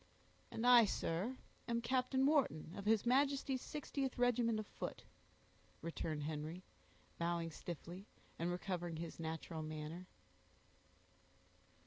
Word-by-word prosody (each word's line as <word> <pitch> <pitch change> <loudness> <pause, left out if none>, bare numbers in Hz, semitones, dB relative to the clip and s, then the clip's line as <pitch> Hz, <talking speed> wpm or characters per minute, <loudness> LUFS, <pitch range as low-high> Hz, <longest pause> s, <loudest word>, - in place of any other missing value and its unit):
"And 225 - -2
I, 245 -2 +9
sir, 200 +6 -1 0.3
am 235 -1 +1
Captain 255 +2 +2
Wharton, 270 - +2
of 200 - -6
his 220 0 +4
Majesty's 270 0 +3
60th 275 -3 -3
regiment 240 -2 +3
of 215 - -3
foot," - - -6 0.8
returned 160 -2 -2
Henry, 155 +4 -4 0.6
bowing 170 -1 0
stiffly, 175 +4 -7 0.3
and 170 +1 +1
recovering 175 -2 -2
his 165 0 -5
natural 160 0 -3
manner. 155 +3 -5
185 Hz, 110 wpm, -39 LUFS, 165-245 Hz, 0.8 s, I